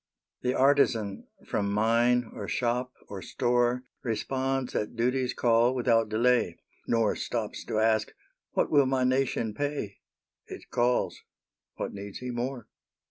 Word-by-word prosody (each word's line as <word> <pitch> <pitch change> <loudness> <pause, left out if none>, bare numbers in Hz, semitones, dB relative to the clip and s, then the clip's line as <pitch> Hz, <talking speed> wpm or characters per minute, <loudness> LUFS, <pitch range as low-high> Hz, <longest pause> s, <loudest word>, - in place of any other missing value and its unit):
The 125 +1 0
artisan 125 -7 +2 0.2
from 100 -1 -1
mine, 115 +3 +2
or 100 - -6
shop, 125 +1 -1 0.2
or 100 -2 -7
store, 120 +4 +1 0.2
Responds 130 +2 -1
at 105 - -2
duty's 125 +2 0
call 120 +1 +3
without 115 -3 +2
delay, 115 -4 +2 0.3
Nor 115 -2 +2
stops - - -3
to - - -2
ask, 110 0 +2 0.4
"What - - +1
will 140 -3 +5
my 130 -1 +1
nation 130 -4 +1
pay?" 145 -6 -3 0.5
It - - -10
calls 120 +1 +1 0.5
what - - -4
needs 100 0 -7
he 125 0 -5
more? 120 0 -4
120 Hz, 135 wpm, -28 LUFS, 110-130 Hz, 0.5 s, will